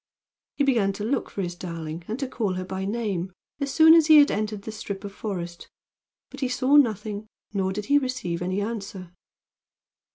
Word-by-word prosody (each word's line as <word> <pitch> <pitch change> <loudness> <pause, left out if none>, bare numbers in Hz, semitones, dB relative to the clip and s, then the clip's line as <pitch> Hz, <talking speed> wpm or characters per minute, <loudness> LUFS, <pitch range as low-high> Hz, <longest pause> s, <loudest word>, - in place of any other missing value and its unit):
He 285 - +2
began 230 -8 +2
to 205 - -6
look 250 +4 -1
for 195 - -4
his 175 -1 -3
darling 170 -2 -6
and 220 - -3
to 270 -1 -3
call 215 -6 -2
her 185 0 -4
by 190 +1 -4
name 200 -4 -2 0.3
as 280 -1 -2
soon 320 0 +7
as 325 -2 +6
he 310 -1 +9
had 290 -1 +7
entered 210 -1 -2
the 220 - -6
strip 200 -2 -6
of 200 -1 -7
forest, 175 -5 -6 0.6
but 275 - -10
he 260 -2 -1
saw 255 +2 +2
nothing 215 -5 +2 0.3
nor 190 -2 0
did 205 +2 -4
he 285 +4 +4
receive 255 -11 -3
any 185 +3 -1
answer. 200 -4 -5
210 Hz, 195 wpm, -25 LUFS, 190-255 Hz, 0.6 s, he